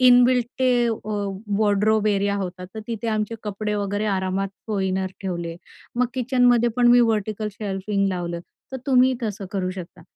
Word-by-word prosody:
Inbuilt 250 -1 +6
ते 245 -2 +3
वॉ 215 -2 -2 0.3
wardrobe 215 0 +3
area 200 0 +1
होता, 180 -2 -4
तर 220 +4 -8
तिथे 230 0 -3
आमचे 215 +1 -1
कपडे 210 0 -3
वगैरे 205 +1 -1
आरामात 190 0 0 0.2
कोइनर 190 -2 0 0.2
ठेवले. 170 -3 -3 0.4
मग 250 0 +3
किचनमध्ये 245 -2 +3
पण 245 -1 +4
मी 245 - +7
व्हर्टिकल 215 -2 0
शेल्फिंग 200 -1 -1
लावलं, 175 -2 -3 0.3
तर - - -2
तुम्ही 260 -1 +5
तसं 205 -3 -3
करू 185 -2 -1
शकता. 185 -2 -9
210 Hz, 155 wpm, -23 LUFS, 195-235 Hz, 0.4 s, मी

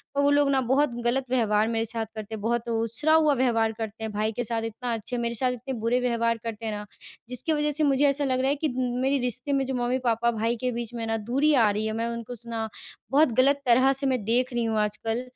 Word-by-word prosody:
और 285 - +2
वो 285 - +4
लोग 285 -1 +3
ना 265 - +2
बहुत 280 -4 +2
गलत 255 +2 +1
व्यवहार 220 -4 +2
मेरे 225 0 -1
साथ 225 0 -3
करते 215 0 -6
है, 210 - -8
बहुत 235 +2 -1
उछरा 230 +7 0
हुआ 310 -2 +5
व्यवहार 230 -3 +2
करते 220 0 -6
हैं। 220 - -3
भाई 215 +1 0
के - - -1
साथ 230 0 -2
इतना 235 +2 -4
अच्छे, 230 +2 -4
मेरे 235 0 -2
साथ 250 +2 +1
इतने 250 +2 -5
बुरे 235 +3 +1
व्यवहार 230 -1 +1
करते 225 -1 -5
हैं 220 - -2
ना, 210 0 -5 0.4
जिसकी 255 +6 -1
वज़ह 300 0 0
से 305 +2 +1
मुझे 280 0 +3
ऐसा 285 +1 0
लग 255 -1 0
रहा 265 +1 +1
है 285 - +2
कि 305 +2 -1 0.3
मेरे 275 +1 +2
रिश्ते 250 +3 -1
में 270 -1 +1
जो 265 - -3
मम्मी-पापा, 240 -1 +1
भाई 225 +1 -1
के 255 -1 0
बीच 235 0 -5
में 230 -1 -4
ना 225 0 0
दूरी 290 +4 +3
आ 230 -6 +5
रही 210 +1 -2
है, 220 - -2
मैं 230 +1 -2
उनको 235 +1 -6
स 235 - -7
ना 225 -1 -3 0.4
बहुत 285 -1 +4
गलत 280 +2 +4
तरह 255 +3 +5
से 275 +1 +1
मैं 255 -5 0
देख 250 +3 +1
रही 240 -1 0
हूँ 220 -1 0
आजकल। 225 +3 -1
240 Hz, 260 wpm, -26 LUFS, 225-265 Hz, 0.4 s, हुआ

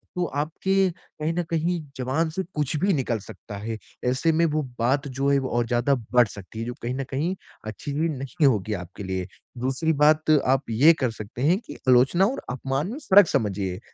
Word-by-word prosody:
तो 180 -1 0
आपके 180 +6 0
कहीं 160 -2 -5
न 175 0 -1
कहीं 170 +1 0 0.2
जवान 135 +6 0
से 190 +3 -2
कुछ 150 0 -1
भी 195 +1 +2
निकल 120 -6 -1
सकता 100 +1 -10
है। 110 +2 -4 0.3
ऐसे 130 +6 +2
में 165 +1 +3
वो 155 -1 0 0.2
बात 135 +5 +1
जो 135 +1 -1
है 140 - +4
वो 130 - -3
और 120 - +2
ज़्यादा 120 +4 +2 0.2
बढ़ 125 -2 +6
सकती 100 +2 -10
है। 115 - -3
जो 120 - -4
कहीं 120 +2 -2
न 135 - -2
कहीं 160 +8 -1 0.3
अच्छी 140 +7 -5
भी 160 +3 0
नहीं 140 +2 -1
होगी 110 -3 +1
आपके 90 +1 -7
लिए। 95 -1 -3 0.3
दूसरी 135 +6 0
बात 155 +1 +4 0.2
आप 135 +2 +2
ये 140 +9 +6
कर 125 -3 +1
सकते 110 +2 -8
हैं, 175 +6 +4
कि - - -11
आलोचना 130 +9 +5
और 255 +7 -2
अपमान 135 - -2
में 270 - -5
फ़र्क 195 -1 +8
समझिए। 100 -8 -1
135 Hz, 205 wpm, -25 LUFS, 120-160 Hz, 0.3 s, फ़र्क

